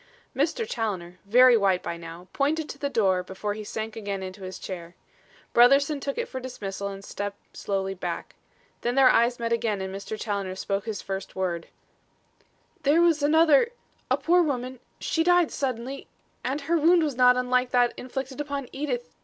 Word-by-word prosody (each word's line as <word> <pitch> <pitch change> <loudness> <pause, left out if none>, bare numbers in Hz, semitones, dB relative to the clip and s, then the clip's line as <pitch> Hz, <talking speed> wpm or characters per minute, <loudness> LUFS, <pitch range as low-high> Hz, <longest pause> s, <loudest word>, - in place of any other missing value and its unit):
Mr. 330 - 0
Challoner, 185 -6 -3
very 245 +4 +7
white 195 -4 +2
by 170 - -3
now, 170 +1 -10
pointed 300 +3 0
to 280 - -8
the 280 - -1
door 190 -8 +2
before 190 +3 -4
he 215 +1 -7
sank 220 +1 -5
again 200 -3 -4
into 185 +1 -8
his 185 -1 -6
chair. 175 -2 -7 0.6
Brotherson 275 +5 +5
took 275 - -3
it 475 - -2
for 260 - -5
dismissal 200 -6 -5
and 195 0 -7
stepped 205 0 -7
slowly 195 -1 -2
back. 180 -2 -5 0.5
Then 240 +1 -1
their 270 -2 +7
eyes 235 +1 +3
met 230 0 -1
again 225 -3 0
and 190 0 -4
Mr. 200 +2 -6
Challoner 200 -4 -3
spoke 195 +1 -2
his 215 -4 -4
first 195 0 -5
word: 175 -3 -2 1.1
"There 300 +1 +4
was 335 -3 +4
another 315 - +4 0.4
a - - +3
poor 355 +2 +3
woman 255 -5 -2 0.2
she 325 - 0
died 355 -1 +4
suddenly 260 0 -3 0.4
and 275 +3 -2
her 335 +4 +1
wound 335 +2 +5
was 295 -4 -1
not 250 0 +5
unlike 250 0 +1
that 245 -1 +3
inflicted 265 +2 -5
upon 280 -3 -4
Edith. 250 -4 -4
240 Hz, 180 wpm, -26 LUFS, 195-280 Hz, 1.1 s, very